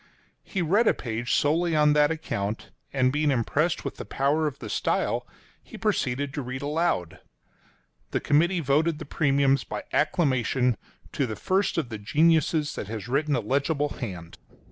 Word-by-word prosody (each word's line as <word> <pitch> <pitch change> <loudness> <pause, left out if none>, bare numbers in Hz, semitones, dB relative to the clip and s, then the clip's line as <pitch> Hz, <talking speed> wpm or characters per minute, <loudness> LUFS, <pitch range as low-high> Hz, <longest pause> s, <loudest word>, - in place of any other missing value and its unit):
— - - -39
He 190 -3 -2
read 205 +8 +3
a - - +4
page 120 0 -4
solely 165 +3 +2
on 150 -1 +5
that 150 0 +4
account; 110 -10 -3 0.2
and 130 -1 +2
being 150 0 +1
impressed 145 +6 0
with - - -4
the - - -5
power 145 +3 +1
of 145 - -5
the - - -8
style, - - -1 0.3
he - - -12
proceeded 135 +2 -1
to 145 - -3
read 130 +1 -5
aloud. 150 - -1 0.9
The - - -1
committee 170 +5 +2
voted 150 +3 +2
the 155 - -7
premiums 140 -3 +2
by 105 - -6
acclamation 130 - +2 0.4
"to 135 - -1
the 110 - -4
first 190 - 0
of 150 -7 -1
the 110 -3 -6
geniuses 155 +5 +2
that - - -5
has 110 0 -6
written 145 +3 +1
a - - 0
legible 140 +5 0
hand." 90 -11 -7
145 Hz, 170 wpm, -26 LUFS, 125-155 Hz, 0.9 s, on